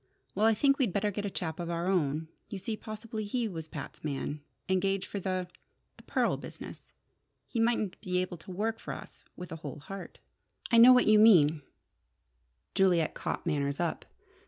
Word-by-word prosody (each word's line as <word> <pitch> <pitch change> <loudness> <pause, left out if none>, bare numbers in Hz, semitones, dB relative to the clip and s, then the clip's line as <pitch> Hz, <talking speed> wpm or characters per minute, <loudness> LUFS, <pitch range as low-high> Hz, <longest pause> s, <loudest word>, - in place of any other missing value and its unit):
"Well, 215 - +3
I 225 - +4
think 275 +4 +3
we'd 245 -8 +2
better 205 +1 +1
get 205 +1 -3
a - - -2
chap 165 -4 -4
of 170 -1 -3
our 170 0 -2
own. 160 -4 +1 0.2
You 200 - -5
see, 215 +3 -3
possibly 215 0 -6
he 230 +3 -1
was 165 -6 -6
Pat's - - -8
man, 145 0 -3 0.3
engaged 190 +1 +1
for 200 - -5
the 185 -1 -2 0.5
the - - -16
pearl - - 0
business. - - -10 0.5
He 235 - -4
mightn't 225 -4 +1
be 180 -3 -1
able 180 -1 -2
to 165 - -14
work 220 +5 -2
for - - -5
us - - -12
with 180 - -8
a 165 - -5
whole 150 -2 -7
heart 195 +7 -9 0.3
" - - -15
"I 230 - +7
know 245 +2 +10
what 250 0 +6
you 215 0 +6
mean," 165 -9 +6 1.1
Juliet 180 -4 +3
caught - - -4
Manners 140 -3 -1
up. 170 -2 -2
190 Hz, 190 wpm, -30 LUFS, 165-215 Hz, 1.1 s, know